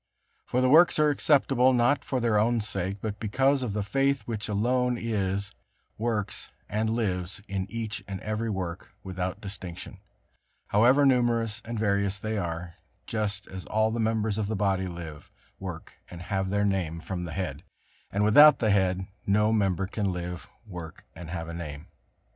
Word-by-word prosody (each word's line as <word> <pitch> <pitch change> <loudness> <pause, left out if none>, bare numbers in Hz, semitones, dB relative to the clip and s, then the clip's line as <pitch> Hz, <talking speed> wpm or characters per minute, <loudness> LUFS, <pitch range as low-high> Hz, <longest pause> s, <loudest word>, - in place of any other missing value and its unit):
For 125 - +1
the 130 - +3
works 165 +5 +6
are 150 -1 +4
acceptable 135 -3 +3
not 130 +3 +3
for 130 - -1
their 115 -3 +2
own 115 +2 +2
sake, 100 -2 -3
but 105 -2 -3
because 135 +6 +2
of 120 -5 -2
the 105 0 -1
faith 135 +6 +1
which 110 -2 -4
alone 125 +4 +1
is, 100 -4 -2 0.4
works 110 -3 -2 0.2
and 110 +1 -1
lives 95 -4 -2
in 95 -1 -3
each 115 0 -4
and 95 -1 -5
every 110 +1 -2
work 95 -2 -5
without 95 +1 -4
distinction, 95 -3 -8 0.7
however 125 +7 +5
numerous 115 -4 +2
and 115 0 -5
various 100 -2 +1
they 110 +2 -3
are, 85 -3 -4 0.3
just 105 -3 -2
as 95 -1 -8
all 110 +1 +1
the 115 - -2
members 110 -1 0
of 105 - -1
the 110 - -1
body 95 -2 +1
live, 80 -4 -8 0.3
work - - -8
and 90 0 -9
have 95 0 -1
their 100 +1 +1
name 90 -5 -1
from 90 +1 -4
the 85 - -6
head, 80 -6 -4 0.5
and 100 +1 +1
without 140 +7 +8
the 110 -2 +2
head 95 -1 +2 0.2
no 105 +2 +3
member 95 -3 +1
can 100 0 -1
live, 90 -1 -5 0.2
work 90 -6 -9
and 85 -1 -9
have 85 -1 -4
a 85 - -6
name. 75 -3 -6
105 Hz, 170 wpm, -27 LUFS, 95-115 Hz, 0.7 s, without